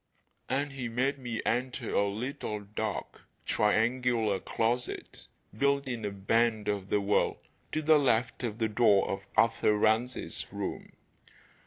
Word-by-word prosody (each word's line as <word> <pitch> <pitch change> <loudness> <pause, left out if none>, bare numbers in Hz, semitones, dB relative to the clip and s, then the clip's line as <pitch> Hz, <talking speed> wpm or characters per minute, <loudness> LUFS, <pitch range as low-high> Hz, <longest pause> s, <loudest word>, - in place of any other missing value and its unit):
And 140 +2 0
he 130 -3 -4
made 135 +4 0
me 120 -3 -4
enter 125 +3 -1
a 100 - +3
little 110 -1 -4
dark, 105 +1 -4 0.2
triangular 115 -1 +2
closet 120 +2 -2 0.3
built 140 +3 +1
in 120 -3 -4
a - - 0
bend 110 +2 +1
of 100 -2 -2
the 105 - +2
wall, 100 +1 +1 0.3
to 155 - -1
the 155 0 +6
left 120 -3 +1
of 110 -3 -2
the 115 -1 +1
door 105 -2 +4
of 95 - -3 0.2
Arthur 115 -2 +3
Rance's 110 +4 0
room. - - -5
115 Hz, 140 wpm, -30 LUFS, 105-125 Hz, 0.3 s, the